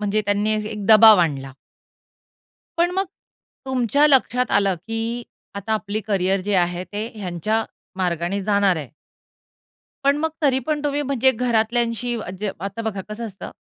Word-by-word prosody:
म्हणजे 210 +1 0
त्यांनी 205 +1 +1
ए 215 - -1
एक 210 -2 -6
दबाव 220 -2 +8
आणला. 135 -5 -2 1.2
पण 345 +1 +2
मग 385 +1 +1 0.6
तुमच्या 265 +3 +2
लक्षात 250 -3 +2
आलं 195 -2 +3
की 225 +2 -3 0.3
आता 210 +2 -2
आपली 215 0 -2
करियर 195 -2 0
जे 200 +1 -1
आहे, 175 0 0
ते 210 +3 -5
ह्यांच्या 210 +3 -2 0.3
मार्गाने 175 +1 -1
जाणार 200 -2 +2
आहे. 150 -6 -6 1.2
पण 280 +1 +3
मग 320 +1 0
तरी 265 -3 +3
पण 300 -1 0
तुम्ही 290 0 0
म्हणजे 265 -2 +2
घरातल्यांशी 235 0 0
अ, 200 - -7
जे 210 -1 -1
आता 195 +4 -5
बघा 205 -4 -3
कसं 230 +2 -5
असतं, 200 -3 -8
215 Hz, 155 wpm, -22 LUFS, 195-245 Hz, 1.2 s, दबाव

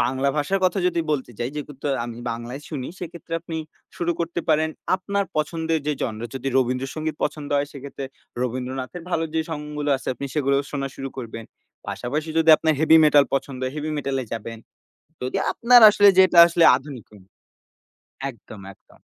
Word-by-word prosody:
বাংলা 130 +3 +1
ভাষার 150 +7 +1
কথা 185 +2 +2
যদি 170 -1 -1
বলতে 135 -4 -3
যাই 120 - -1
যেহেতু 150 0 -6 0.3
আমি 120 -1 -7
বাংলায় 120 +5 -6
শুনি, 135 -5 -4
সেক্ষেত্রে 170 -1 -9
আপনি 165 -1 -5 0.4
শুরু 175 0 0
করতে 170 +1 -2
পারেন 155 0 +3 0.3
আপনার 200 +1 -2
পছন্দের 160 +1 0
যেই 150 -2 -1
জনরা। 115 -1 -3
যদি 135 +1 -3
রবীন্দ্রসঙ্গীত 135 +5 -2
পছন্দ 145 -2 -4
হয় 140 0 0
সেক্ষেত্রে 140 0 -7 0.4
রবীন্দ্রনাথের 130 +6 -4
ভালো 165 -1 0
যে 160 - +2
সংগুলো 150 -1 -3
আছে - - -8
আপনি 140 - -5
সেগুলোও 140 -1 +2
শোনা 135 -1 -2
শুরু 135 - -5
করবেন। 115 -2 -7 0.4
পাশাপাশি 150 +6 -3
যদি 165 0 +5
আপনার 160 -1 +1
হেভি 160 +1 +6
মেটাল 145 -2 +6
পছন্দ 135 -1 -3
হয় 130 - -3
হেভি 155 +1 -3
মেটালে 135 -2 -2
যাবেন। 115 0 -5 0.6
যদি 130 +9 -2 0.2
আপনার 245 0 +6
আসলে 205 -1 +6
যেটা 185 -2 +5
আসলে 170 0 +2
আধুনিক 135 -4 -10 1.3
একদম, 110 -4 -13
একদম। - - -25
145 Hz, 165 wpm, -23 LUFS, 130-160 Hz, 1.3 s, হেভি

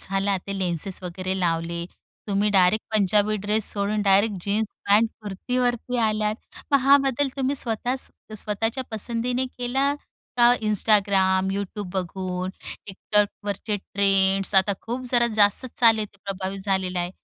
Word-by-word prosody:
झाला 195 0 0
ते 200 - -4
लेन्सेस 185 +1 0
वगैरे 185 +1 -4
लावले. 170 -1 -1 0.4
तुम्ही 205 +1 +1
डायरेक्ट 195 +2 +3
पंजाबी 210 +1 +2
ड्रेस 210 +1 +3
सोडून 205 +1 -1
डायरेक्ट 200 +1 +3
जीन्स, 210 +2 0 0.2
पॅन्ट, 215 +3 +4
कुर्तीवरती 245 +4 -2
आल्यात. 215 0 -1 0.4
मग 280 - +6
हा 275 +2 +6
बदल 270 +2 0
तुम्ही 270 +1 0
स्वतःच 245 +2 0 0.3
स्वतःच्या 225 +5 -2
पसंतीने 240 +4 0
केला 260 +3 -1 0.4
का 240 0 +6
Instagram, 195 -3 +2
Youtube 200 -1 -5
बघून, 185 0 -3 0.4
Tiktokवरचे 205 +1 -2
ट्रेंड्स. 195 0 +1
आता 190 +1 +4
खूप 245 +3 -5
जरा 240 -1 +4
जास्तच 205 +5 +2
चालू 225 -2 +5
आहे, 210 - -2
ते 200 - -27
प्रभावित 195 0 -4
झालेलं 190 -2 -1
आहे. 175 0 -2
205 Hz, 135 wpm, -24 LUFS, 190-225 Hz, 0.4 s, मग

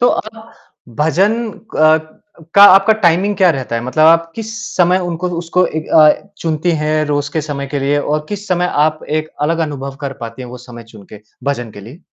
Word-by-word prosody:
तो 245 - +4
आप 220 +1 -5 0.5
भजन 175 +8 +2 0.4
क 155 +3 +2 0.4
का 200 - +7
आपका 195 +3 +5
टाइमिंग 185 +4 +2
क्या 185 -2 +4
रहता 130 -6 -3
है? 115 - -3
मतलब 155 +5 +1
आप 165 0 +4
किस 220 -1 -6 0.3
समय 180 +1 +3
उनको 175 +2 -3
उसको 175 +2 0
एक 155 0 -5
अ, 155 -1 +6 0.3
चुनती 160 +1 -1
हैं 155 0 0
रोज़ 145 -1 -2
के 160 - -1
समय 140 -2 -5
के 145 +1 -4
लिए 140 +2 +1
और 150 +1 -2
किस 205 0 -6
समय 180 -1 +1 0.2
आप 155 0 -1 0.2
एक 155 0 -5
अलग 165 +2 0
अनुभव 140 -2 -7
कर 140 -1 -4
पाती 115 +2 -7
हैं? 125 - -9
वो 125 - -8
समय 120 -1 -12
चुन 105 -2 -13
के, 105 - -11 0.2
भजन 120 -5 -3
के 100 - -11
लिए? 125 - -13
155 Hz, 210 wpm, -15 LUFS, 140-180 Hz, 0.5 s, का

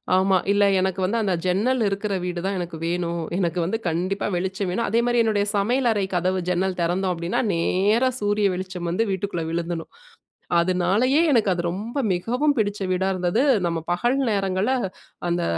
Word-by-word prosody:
ஆமா. 190 0 +3
இல்ல 205 0 +3 0.2
எனக்கு 190 0 -1
வந்து 200 +5 0
அந்த 195 -3 +1
ஜன்னல் 215 +8 +1
இருக்கிற 200 +1 -2
வீடு 180 -1 -3
தான் 195 -1 -1
எனக்கு 170 -2 -5
வேணும். 170 0 -1 0.2
எனக்கு 175 -2 0
வந்து 190 +7 -1
கண்டிப்பா 180 +4 -1
வெளிச்சம் 190 +2 -2
வேணும். 230 +5 -1
அதே 230 +3 +2
மாரி 240 -1 +3
என்னுடைய 205 -2 +1
சமையல் 240 +6 +1
அறை 205 -3 0
கதவு 185 +1 +1
ஜன்னல் 185 +1 0
திறந்தோம் 180 +2 0
அப்டின்னா, 170 +1 -2
நேரா 205 +9 +2
சூரிய 205 -1 +2
வெளிச்சம் 180 -1 -5
வந்து 205 +7 +1
வீட்டுக்குள்ள 190 -3 -2
விழுந்துடணும். 170 0 -3 0.7
அதனாலேயே 185 - +2
எனக்கு 220 -6 +3
அது 175 - -2
ரொம்ப 220 +9 -5 0.2
மிகவும் 250 +11 0
பிடிச்ச 205 -1 0
வீடா 185 +1 +1
இருந்தது. 185 +7 +1 0.2
நம்ம 170 -1 -1
பகல் 240 +9 +1
நேரங்கள்ல 195 +4 0 0.6
அந்த 175 0 0
190 Hz, 165 wpm, -23 LUFS, 175-210 Hz, 0.7 s, ஆமா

